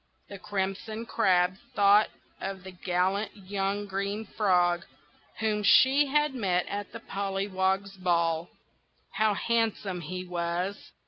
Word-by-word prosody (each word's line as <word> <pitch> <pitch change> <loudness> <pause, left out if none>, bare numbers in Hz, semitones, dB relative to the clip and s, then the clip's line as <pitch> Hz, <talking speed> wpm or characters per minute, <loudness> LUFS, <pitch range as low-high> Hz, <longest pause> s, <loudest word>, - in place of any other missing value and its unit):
The 200 - -8
Crimson 205 +4 -3
Crab 185 -3 +2 0.2
thought 205 +1 +5 0.3
of 190 -1 -5
the 190 - -8
gallant 185 +4 -1
young 200 +1 -2
Green 200 +2 -3
Frog, 180 -4 +2 0.5
whom 215 -1 0
she 265 +7 +6
had 295 0 +2
met 185 -8 0
at 205 -1 -5
the - - -8
Pollywogs' 195 0 -1
Ball. 170 -2 +1 0.6
How 215 +1 +2
handsome 220 -5 0
he 180 +3 -5
was! 175 +2 -3
195 Hz, 120 wpm, -28 LUFS, 180-205 Hz, 0.6 s, she